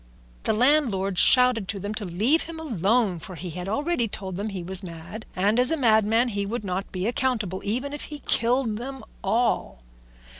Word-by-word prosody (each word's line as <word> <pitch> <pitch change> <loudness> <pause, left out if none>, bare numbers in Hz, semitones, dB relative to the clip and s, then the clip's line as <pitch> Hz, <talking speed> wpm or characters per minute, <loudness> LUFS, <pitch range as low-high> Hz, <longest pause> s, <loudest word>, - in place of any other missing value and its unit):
The - - +2
landlord 215 - +2
shouted 250 -5 +5
to 200 +1 -3
them 205 +2 -4
to 215 -1 -4
leave 215 - +1
him 330 -1 -8
alone, 220 - +1
for 185 +3 -9
he 175 +1 -6
had 180 +3 -5
already 285 +1 0
told 190 -3 -6
them 200 +4 -3
that 210 - -5
he 185 -3 -5
was 190 +2 0
mad, 175 +4 -9
and 205 +5 +2
as 250 +1 +5
a 325 - +1
madman 225 -1 +3
he 200 -2 -2
would 215 +3 -4
not 190 0 -4
be 185 0 -3
accountable 225 -6 -1
even 255 +7 -2
if 290 - -4
he 295 -1 -9
killed 235 -2 +3
them 265 +3 -7 0.2
all. 220 - 0
215 Hz, 195 wpm, -25 LUFS, 190-250 Hz, 0.2 s, shouted